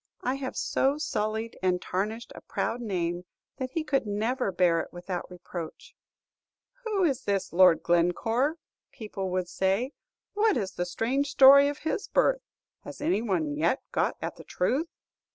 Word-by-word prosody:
I 255 - 0
have 270 -1 -5
so 275 +2 +1
sullied 220 -6 -2
and 180 -1 +2
tarnished 210 +7 -3
a - - -11
proud 240 - -3
name 175 -5 -2 0.3
that 260 -1 -3
he 315 +4 -2
could 275 -7 0
never 220 +2 -1
bear 175 -3 +3
it - - -5
without 175 0 -5
reproach. 175 -2 -8 0.9
'Who 420 -4 0
is 275 -6 +1
this 200 -6 -2
Lord 180 -1 +6
Glencore?' 225 - +2 0.4
people 200 -4 -5
would 185 -1 -1
say. 195 +8 0 0.4
'What 425 0 +3
is 195 -4 -2
the 175 - -3
strange 255 +9 0
story 280 +1 +8
of 290 0 -2
his 320 +7 -3
birth? - - +2 0.4
Has - - -9
any 300 -6 +1
one 170 -10 -1
yet 170 - +1
got - - 0
at - - -4
the - - -11
truth? 260 - 0
215 Hz, 160 wpm, -28 LUFS, 180-275 Hz, 0.9 s, story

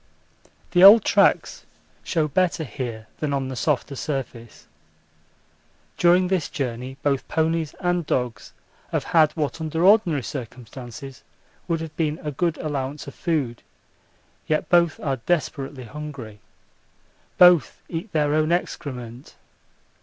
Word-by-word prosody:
The 175 0 +4
old 205 +2 +10
tracks - - +2 0.4
show 160 -3 0
better 175 +2 0
here 115 -3 -6
than 150 -2 -1
on 135 -1 -2
the 130 - -5
softer 140 +1 -1
surface. 120 -3 -6 1.3
During 180 +1 +4
this 180 -5 -1
journey 130 0 -4
both 140 -2 0
ponies 160 -1 -1
and 175 -1 0
dogs 120 -4 -2 0.4
have - - 0
had 155 -2 +4
what 155 +1 -3
under 160 +1 -2
ordinary 185 - +4
circumstances 130 +2 -8 0.5
would 165 -2 -1
have 160 -1 -7
been 155 0 -1
a 150 - -3
good 165 +2 -1
allowance 145 -1 -4
of 140 - -9
food, 145 -9 -2 0.9
yet 155 0 0
both 170 -2 +3
are 135 -3 -1
desperately 140 -1 -2
hungry. 130 -5 -8 1.0
Both 180 -6 +5
eat 170 +5 -5
their 150 -2 +1
own 155 +1 +2
excrement. 125 -7 -4
150 Hz, 125 wpm, -23 LUFS, 130-165 Hz, 1.3 s, old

